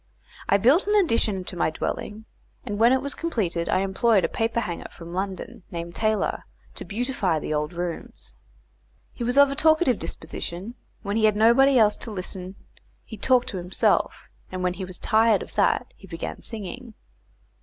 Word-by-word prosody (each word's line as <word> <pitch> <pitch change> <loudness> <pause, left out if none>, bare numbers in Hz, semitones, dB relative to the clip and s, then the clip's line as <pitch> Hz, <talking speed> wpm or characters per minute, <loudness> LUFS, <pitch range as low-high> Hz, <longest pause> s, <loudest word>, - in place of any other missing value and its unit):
I 200 - +5
built 270 - +4
an 415 - +2
addition 230 - +2
to 180 - -7
my 165 - +1
dwelling; 210 +6 -4 0.4
and 205 0 -4
when 230 +2 +6
it 260 0 +2
was 280 - -2
completed 190 - -2
I 185 - +2
employed 195 +1 +2
a - - +2
paperhanger 225 -6 -2
from 170 0 -11
London 190 +1 -4
named 170 0 -6
Taylor, 215 +1 0 0.3
to - - -7
beautify 215 -6 -1
the 155 - -3
old 150 +1 -1
rooms. 175 -1 -6 0.8
He 240 - -5
was 245 +3 0
of 280 -1 +7
a - - -3
talkative 315 -5 +3
disposition; 175 +6 -6 0.3
when 205 +1 -1
he 220 - +3
had 215 -1 +4
nobody 245 +5 +5
else 210 -2 +4
to - - -6
listen 185 -1 -5 0.5
he 220 - -8
talked 245 +4 +2
to 190 - -5
himself, 180 +1 0 0.2
and 185 0 -4
when 180 0 +1
he 190 0 -5
was 180 -1 -6
tired 220 -1 +3
of - - -14
that - - +1
he - - -15
began - - -6
singing. 225 +2 -7
210 Hz, 175 wpm, -25 LUFS, 185-240 Hz, 0.8 s, of